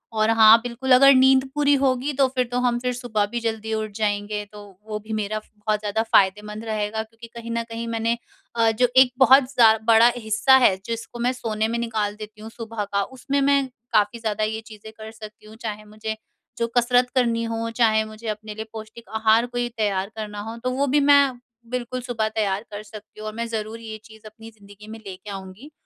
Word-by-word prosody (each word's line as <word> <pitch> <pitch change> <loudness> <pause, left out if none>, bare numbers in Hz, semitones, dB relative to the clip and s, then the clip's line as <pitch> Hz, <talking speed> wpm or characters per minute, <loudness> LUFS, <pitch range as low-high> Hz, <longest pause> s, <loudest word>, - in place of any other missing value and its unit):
और 215 0 +2
हाँ 225 0 +8
बिल्कुल, 245 +2 -4
अगर 275 +2 +8
नींद 265 0 +5
पूरी 290 -1 +3
होगी 265 +1 +1
तो 270 0 +3
फिर 250 -1 +2
तो 245 - 0
हम 245 -1 +1
फिर 250 0 -2
सुबह 240 -4 -1
भी 240 - -2
जल्दी 220 -1 -3
उठ 215 -1 -3
जाएँगे 210 -1 -2
तो 210 -1 -11 0.3
वो 210 -1 -4
भी 220 +1 -8
मेरा 215 0 -2 0.2
बहुत 210 0 -1
ज़्यादा 215 +1 -1
फ़ायदेमंद 210 +1 +1
रहेगा 215 0 -2
क्योंकि 225 +1 -14
कहीं 235 0 -7
न 230 0 -1
कहीं 230 0 -5
मैंने 230 +1 -1 0.4
अ, 225 -1 +3
जो 245 +3 +2
एक 260 -1 +7
बहुत 265 +1 +7
जा 225 -2 +7
बड़ा 230 +1 +7
हिस्सा 220 +4 +3
है 190 - +5
जिसको 230 +1 -6
मैं 245 +2 +1
सोने 220 -3 -2
में 235 - -2
निकाल 215 -3 -2
देती 215 0 -11
हूँ 220 - -8
सुबह 225 -2 -6
का, 200 0 -1
उसमें 270 +3 -3
मैं 280 -1 +3 0.3
काफ़ी 215 +3 +2
ज़्यादा 215 -1 -2
ये 220 +1 -2
चीज़ें 220 0 -12
कर 220 0 -9
सकती 215 -1 -12
हूँ। 215 +1 -13
चाहे 215 -2 -6
मुझे 215 +1 -6 0.4
जो 235 0 0
कसरत 245 +1 +3
करनी 235 -2 +1
हो, 230 0 -3
चाहे 220 -2 +3
मुझे 215 +1 -10
अपने 215 0 -5
लिए 220 - -6
पौष्टिक 220 +1 -10
आहार 220 +2 +3
कोई 245 0 -3
तैयार 200 -2 -1
करना 210 -1 -6
हो 225 +2 -7
तो 255 - 0
वो 280 +2 0
भी 290 +3 +3
मैं 280 -3 +4 0.3
बिल्कुल 250 0 -4
सुबह 240 -3 -2
तैयार 205 -2 0
कर 205 +1 -7
सकती 215 0 -13
हूँ 215 - -6
और 215 - -5
मैं 235 0 -3
ज़रूर 220 0 -5
ये 220 -1 -8
चीज़ 220 0 -17
अपनी 225 +1 -13
ज़िंदगी 205 -1 -16
में 225 +1 -9
लेके 190 +2 -9
आऊँगी। 195 +9 -9
225 Hz, 215 wpm, -23 LUFS, 215-240 Hz, 0.4 s, हाँ